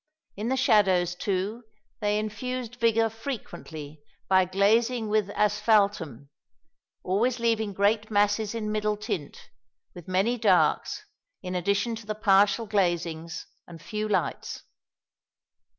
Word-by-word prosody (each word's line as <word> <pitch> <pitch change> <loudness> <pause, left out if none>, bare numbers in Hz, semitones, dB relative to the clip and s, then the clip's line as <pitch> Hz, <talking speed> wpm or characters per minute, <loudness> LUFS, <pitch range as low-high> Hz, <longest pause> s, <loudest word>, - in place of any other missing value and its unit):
In 215 +4 -3
the 265 - +1
shadows, 190 -8 +3
too, 195 +5 -2 0.4
they 210 0 +1
infused 240 +3 -4
vigour 230 -1 +3
frequently 175 - -7 0.3
by 190 -1 +4
glazing 220 +5 +2
with 210 -2 +1
asphaltum, 205 - +1 0.7
always 230 +7 +1
leaving 225 -2 +1
great 210 +2 +1
masses 205 +1 +1
in 215 -2 -3
middle 210 0 0
tint, 205 -9 -6 0.4
with 175 -2 -12
many 195 +7 +1
darks, 220 - +2 0.4
in 180 0 -4
addition 200 +6 0
to 220 -2 -12
the 215 - -2
partial 205 +2 +3
glazings, 175 -5 -1 0.2
and 170 -2 -11
few 210 +7 -4
lights." 190 -4 -2
210 Hz, 120 wpm, -27 LUFS, 185-225 Hz, 0.7 s, by